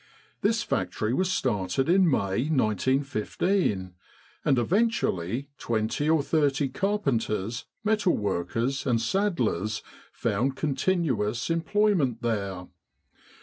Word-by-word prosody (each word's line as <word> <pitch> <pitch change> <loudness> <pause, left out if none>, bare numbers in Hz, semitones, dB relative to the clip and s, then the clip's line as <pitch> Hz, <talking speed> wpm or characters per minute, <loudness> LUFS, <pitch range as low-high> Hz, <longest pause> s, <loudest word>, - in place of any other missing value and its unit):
This 225 +2 +2
factory 110 - -1
was 185 +6 +1
started 105 - 0
in 180 0 +5
May, 120 +1 0
1915, 130 - 0 0.5
and 135 -3 +3
eventually 135 - 0
20 115 +6 -1
or 160 -3 +3
30 145 -3 +1
carpenters, 120 - -1 0.2
metal 215 -4 +2
workers, 115 +7 -1
and 120 -3 +2
saddlers 115 - 0 0.3
found 135 +2 -1
continuous 135 - 0
employment 165 - +1
there. 100 -5 -2
130 Hz, 95 wpm, -27 LUFS, 110-170 Hz, 0.5 s, in